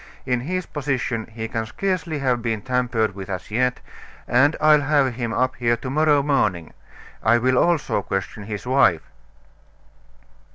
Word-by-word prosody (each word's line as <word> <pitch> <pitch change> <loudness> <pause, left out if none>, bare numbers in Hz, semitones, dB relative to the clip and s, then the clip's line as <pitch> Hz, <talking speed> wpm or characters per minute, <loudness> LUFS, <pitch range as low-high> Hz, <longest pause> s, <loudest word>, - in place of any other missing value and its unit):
In 125 -2 0
his 180 +7 -3
position 130 -6 -3
he 110 0 -6
can 110 0 -3
scarcely 180 - -2
have 130 -4 0
been 110 -3 -2
tampered 125 -4 0
with 95 0 -8
as 90 +1 -6
yet, 125 +3 0 0.5
and 140 +6 +3
I'll 155 -1 +5
have 140 -3 +2
him 120 -1 -3
up 130 +2 0
here 120 -1 +1
to 130 +2 -6
morrow 150 -1 +3
morning; 100 - 0 0.5
I 110 +3 +4
will 130 +2 +1
also 170 -11 +1
question 95 +2 -4
his 105 +1 -6
wife." 125 - +3
125 Hz, 155 wpm, -22 LUFS, 110-140 Hz, 0.5 s, I'll